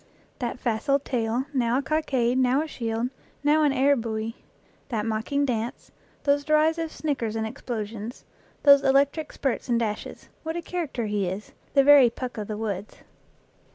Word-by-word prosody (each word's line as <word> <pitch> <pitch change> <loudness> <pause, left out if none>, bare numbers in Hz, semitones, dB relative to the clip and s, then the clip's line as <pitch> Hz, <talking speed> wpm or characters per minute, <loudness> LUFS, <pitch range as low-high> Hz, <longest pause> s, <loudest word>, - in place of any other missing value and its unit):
That 245 -2 -3
facile 245 +3 +1
tail, 245 -2 -1
now 245 -2 +2
a - - +1
cockade, 260 -6 +1
now 260 +3 +3
a - - -6
shield, 230 -2 -2 0.3
now 300 +2 +4
an 295 -2 +4
air 275 +1 +4
buoy; 225 -1 -3 0.5
that 220 -4 -1
mocking 230 +6 0
dance, 240 0 -3 0.3
those 285 0 +2
derisive 315 +2 +2
snick 290 -5 -2
ers 225 -1 -2
and 220 0 -1
explosions; 225 -2 -6 0.4
those 280 -1 +8
electric 280 +3 +2
spurts 270 -2 -2
and 235 -1 +3
dashes 215 -2 -4
what 320 +1 -4
a - - -2
character 320 -10 -3
he 205 -2 -1
is 190 +4 -5 0.2
the 275 - +7
very 280 -3 +8
Puck 245 0 -6
of 210 - -4
the 215 - -4
woods 205 -2 -5
250 Hz, 165 wpm, -26 LUFS, 225-285 Hz, 0.5 s, those